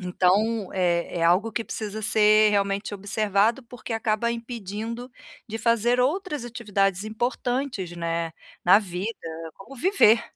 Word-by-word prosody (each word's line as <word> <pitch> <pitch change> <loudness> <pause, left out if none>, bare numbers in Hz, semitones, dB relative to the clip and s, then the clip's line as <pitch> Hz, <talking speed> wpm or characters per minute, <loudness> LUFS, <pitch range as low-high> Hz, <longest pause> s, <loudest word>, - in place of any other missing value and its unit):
Então, 190 +4 +1
é 175 -2 0
é - - -1
algo 185 +7 +3
que 235 +1 -1
precisa 215 -1 -5
ser 215 0 +5
realmente 200 0 0
observado, 205 +4 +1
porque 240 0 -8
acaba 225 +1 0
impedindo 230 +1 -6 0.4
de 220 +1 -4
fazer 235 +2 +2
outras 300 - 0
atividades 205 -5 -1
importantes, 240 -2 -2
né, 165 -1 -2 0.3
na 185 +4 +7
vida, 195 +2 -4 0.4
como 265 +8 -13
viver, 240 - +4
215 Hz, 130 wpm, -25 LUFS, 195-235 Hz, 0.4 s, na